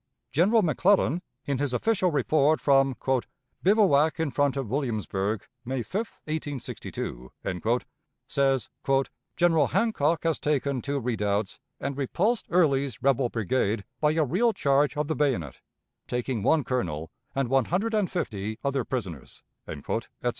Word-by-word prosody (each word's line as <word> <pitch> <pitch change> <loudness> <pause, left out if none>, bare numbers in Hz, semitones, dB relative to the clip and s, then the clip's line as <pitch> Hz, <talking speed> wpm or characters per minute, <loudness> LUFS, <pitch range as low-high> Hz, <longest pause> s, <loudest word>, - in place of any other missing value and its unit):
General 205 +8 +4
McClellan, 175 0 +3 0.2
in 140 -2 -1
his 140 -3 -1
official 190 - +2
report 150 +1 +2
from 135 -2 +3 0.7
"bivouac 170 -7 +4
in 160 -3 0
front 145 -1 +1
of 135 -4 -2
Williamsburg, 110 -5 -2 0.2
May 125 0 -2
5, 210 - -4
1862," 140 - -5 1.0
says, 135 -4 +1 0.7
"General 165 -4 +4
Hancock 165 -9 +1
has 165 -3 +1
taken 140 -3 0
two 140 +2 -2
redoubts 105 -4 -1 0.2
and 140 0 -3
repulsed 185 - 0
Early's 140 - +2
rebel 135 -2 +3
brigade 110 -2 0
by 150 0 +3
a 160 -1 +2
real 220 - +2
charge 145 -4 +2
of 150 0 0
the 160 - -1
bayonet, 120 - 0 0.5
taking 125 -2 -2
one 155 +8 +3
colonel 85 - -2 0.2
and 135 -2 +1
one 135 0 +3
hundred 205 +6 -1
and 210 -4 +1
fifty 110 - -3
other 140 -2 0
prisoners," 95 - -6 0.2
etc. - - -3
140 Hz, 130 wpm, -27 LUFS, 120-160 Hz, 1.0 s, General